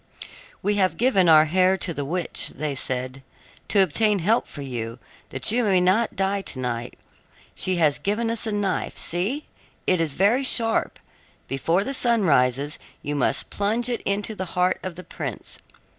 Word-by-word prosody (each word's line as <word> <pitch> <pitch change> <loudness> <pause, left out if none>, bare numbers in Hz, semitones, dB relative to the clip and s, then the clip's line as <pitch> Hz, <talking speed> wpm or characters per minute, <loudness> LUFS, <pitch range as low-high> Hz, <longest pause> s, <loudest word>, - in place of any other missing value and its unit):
"We 205 0 +1
have 185 -5 +1
given 210 -8 +3
our 155 -1 +7
hair 185 +4 +3
to 180 -2 -1
the 145 - -3
witch," 170 +4 -1 0.2
said 130 -1 -3
they, 135 0 -15 0.4
"to 200 -2 +4
obtain 210 +5 +2
help 210 +6 +1
for 145 - -8
you, 120 -3 -5 0.3
that 130 +9 +2
you 245 +2 +2
may 195 -4 +3
not 190 +6 +2
die 195 +1 0
to 155 - -5
night. 120 -1 -4 0.6
She 185 - 0
has 155 -4 +2
given 225 +3 -1
us 230 0 -1
a - - -1
knife; 205 -2 -2
see, 205 - -2 0.4
it 185 -2 +2
is 155 -4 -1
very 210 +8 +3
sharp. 230 -4 +1 0.5
Before 165 +8 0
the 275 - -4
sun 235 -4 +2
rises 140 -1 +2 0.2
you 145 0 -2
must 140 - 0
plunge 225 +4 0
it 240 - -2
into 205 +2 -1
the 190 -3 -4
heart 180 +1 +2
of 185 -2 -6
the 180 - -9
prince. - - -6
185 Hz, 175 wpm, -24 LUFS, 145-210 Hz, 0.6 s, our